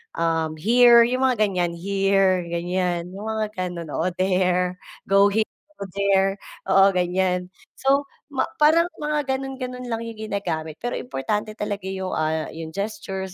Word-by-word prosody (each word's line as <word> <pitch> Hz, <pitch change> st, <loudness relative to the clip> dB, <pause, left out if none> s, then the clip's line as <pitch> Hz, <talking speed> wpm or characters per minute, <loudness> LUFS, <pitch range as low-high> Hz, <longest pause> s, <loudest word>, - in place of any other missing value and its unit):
um, 165 Hz, -1 st, 0 dB
here, 235 Hz, +7 st, +6 dB
yung 255 Hz, +3 st, +2 dB
mga 240 Hz, -4 st, +2 dB
ganiyan, 180 Hz, -4 st, 0 dB
here, 195 Hz, +1 st, +2 dB
ganiyan, 175 Hz, 0 st, -2 dB
yung 195 Hz, +2 st, -8 dB
mga 220 Hz, -1 st, -1 dB
ganun, 175 Hz, -3 st, -4 dB
oo, -, -, -1 dB
there, 180 Hz, -1 st, +1 dB, 0.3 s
go 195 Hz, +1 st, +6 dB
here, 220 Hz, +1 st, +1 dB, 0.3 s
or 200 Hz, -, -4 dB
there, 195 Hz, -1 st, +3 dB, 0.4 s
oo, 195 Hz, 0 st, +6 dB
ganiyan. 180 Hz, 0 st, 0 dB, 0.2 s
So, 275 Hz, +1 st, +2 dB, 0.6 s
parang 320 Hz, +3 st, +6 dB, 0.2 s
mga 295 Hz, -2 st, 0 dB
gano'n-gano'n 255 Hz, -2 st, -5 dB
lang 230 Hz, 0 st, -3 dB
yung 225 Hz, -1 st, -8 dB
ginagamit. 160 Hz, -6 st, -3 dB
Pero 245 Hz, -, -4 dB
importante 210 Hz, -, -3 dB
talaga 205 Hz, -2 st, -3 dB
yung, 190 Hz, -1 st, -4 dB
ah, 155 Hz, 0 st, -1 dB
yung 160 Hz, 0 st, -6 dB
gestures, 190 Hz, 0 st, -5 dB
195 Hz, 145 wpm, -23 LUFS, 180-230 Hz, 0.6 s, here